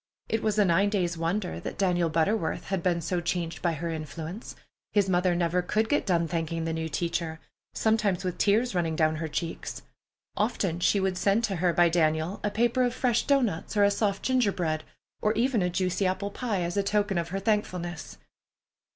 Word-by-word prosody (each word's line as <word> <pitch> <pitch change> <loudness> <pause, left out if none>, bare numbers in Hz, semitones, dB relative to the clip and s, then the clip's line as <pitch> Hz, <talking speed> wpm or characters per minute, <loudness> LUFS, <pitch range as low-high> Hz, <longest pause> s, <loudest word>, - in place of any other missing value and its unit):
It 225 - 0
was 215 -1 0
a 210 - +5
nine 190 +3 +3
days' 180 -5 0
wonder 175 +4 -2
that - - -6
Daniel 175 -3 +2
Butterworth 165 +3 0
had 190 -2 0
been 170 -1 +1
so 175 +2 -1
changed 170 -2 -2
by 170 -1 +1
her 165 +2 -3
influence. 160 - -6 0.4
His 205 -2 +3
mother 180 -1 +2
never 175 +1 +1
could 215 +5 0
get 290 - +1
done 170 -3 +2
thanking 165 0 -2
the 165 - -1
new 160 0 -3
teacher, 165 0 -2 0.4
sometimes 215 -4 +1
with 180 -2 -3
tears 220 +4 +2
running 165 -3 0
down 155 -1 +2
her 160 +1 -3
cheeks. 165 +2 -4 0.5
Often 200 -6 0
she 200 +3 +3
would 190 -1 0
send 205 +3 +2
to 195 -5 -1
her 175 +1 +2
by 175 0 +4
Daniel 160 +2 +1
a 205 - +1
paper 240 +4 +1
of 245 -1 +1
fresh 245 -3 +1
doughnuts 235 - +1
or 205 - +5
a 200 - +5
soft 200 -1 0
ginger 255 -5 +2
bread, 155 -4 -2 0.4
or 215 - +2
even 235 -1 +1
a 180 - +1
juicy 185 +2 0
apple 190 +2 -2
pie, 210 -6 -2
as 170 0 -3
a 200 - +3
token 200 -2 +1
of 170 - -3
her 195 +2 -2
thankfulness. 185 -5 -2
180 Hz, 200 wpm, -27 LUFS, 170-205 Hz, 0.5 s, a